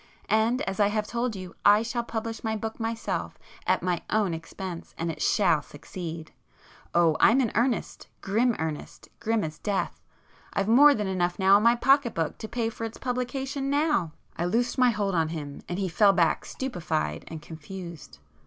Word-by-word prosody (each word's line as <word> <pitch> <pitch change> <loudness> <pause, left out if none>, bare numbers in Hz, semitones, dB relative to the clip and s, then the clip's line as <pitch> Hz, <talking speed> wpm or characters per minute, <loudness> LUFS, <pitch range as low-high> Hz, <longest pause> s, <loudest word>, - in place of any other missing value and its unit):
And 225 +3 +2
as 195 +1 -4
I 205 - +5
have 210 +1 -1
told 235 0 -2
you, 185 -2 -8
I 205 +2 +6
shall 235 +1 -2
publish 225 -1 -5
my 220 -1 -1
book 220 +2 -5
myself 225 0 -3 0.3
at - - +2
my 180 -1 0
own 210 -5 +1
expense, 170 +2 -7
and 165 0 -1
it - - -9
shall 175 -8 +3
succeed! 160 +2 -8 0.6
Oh 170 -2 +4
I'm 240 +4 +6
in 245 -5 +1
earnest, 235 +1 -1
grim 225 +4 +1
earnest, 160 -2 -5
grim 225 -1 0
as 155 -1 -5
death!—I've 195 -1 -4
more 280 +6 +7
than 210 - -2
enough 180 -1 -1
in 195 +2 +6
my 235 +2 +5
pocketbook 240 - +2
to 220 - -5
pay 235 0 -1
for 230 - -8
its 225 0 -5
publication 265 +2 -2
now!" 285 - +1 0.2
I 170 - -1
loosed 240 +8 0
my 250 -1 +6
hold 205 -4 -1
of 165 -2 +1
him, 145 -3 -6
and 175 - -2
he 195 -1 -1
fell 200 +3 +4
back 170 -4 +2
stupefied 155 - -3
and 160 - -7
confused. 165 +1 -9
205 Hz, 175 wpm, -27 LUFS, 170-235 Hz, 0.6 s, more